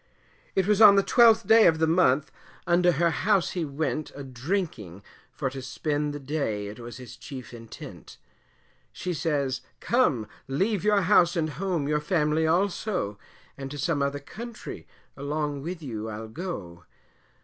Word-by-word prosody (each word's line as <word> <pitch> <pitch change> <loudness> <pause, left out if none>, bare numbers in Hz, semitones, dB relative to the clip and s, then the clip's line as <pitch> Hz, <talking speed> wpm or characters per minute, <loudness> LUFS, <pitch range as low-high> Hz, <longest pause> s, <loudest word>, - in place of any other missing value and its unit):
It 190 - +2
was 210 +1 +2
on 205 -2 +10
the 195 - +4
12th 230 -2 +5
day 220 +2 +7
of 160 - +4
the 160 - +2
month, 160 -4 +3 0.3
unto 175 +1 +4
her 170 +3 +2
house 195 +3 +1
he 175 - -2
went 155 +1 -3
A 140 - -7
drinking, 125 - -4 0.3
for 140 - -3
to 135 0 -6
spend 145 +3 -2
the 145 - -6
day, 135 -8 -2
it 105 +2 -8
was 120 0 -8
his 125 -2 -10
chief 125 -1 -9
intent; 115 -1 -11 0.7
She 180 - -4
says, 145 -5 -1 0.2
come 150 - +1 0.2
leave 190 +9 0
your 210 -1 +3
house 175 -2 +4
and 155 -2 0
home, 175 -4 -2
your 150 0 +1
family 155 -1 +1
also, 180 - 0 0.4
And 135 -1 -7
to 145 - -7
some 145 +1 0
other 140 +1 0
country, 215 - -9 0.3
along 145 0 -3
with 170 +2 -6
you 110 -5 -5
I'll 110 +1 -7
go. 100 - -6
150 Hz, 160 wpm, -26 LUFS, 130-180 Hz, 0.7 s, on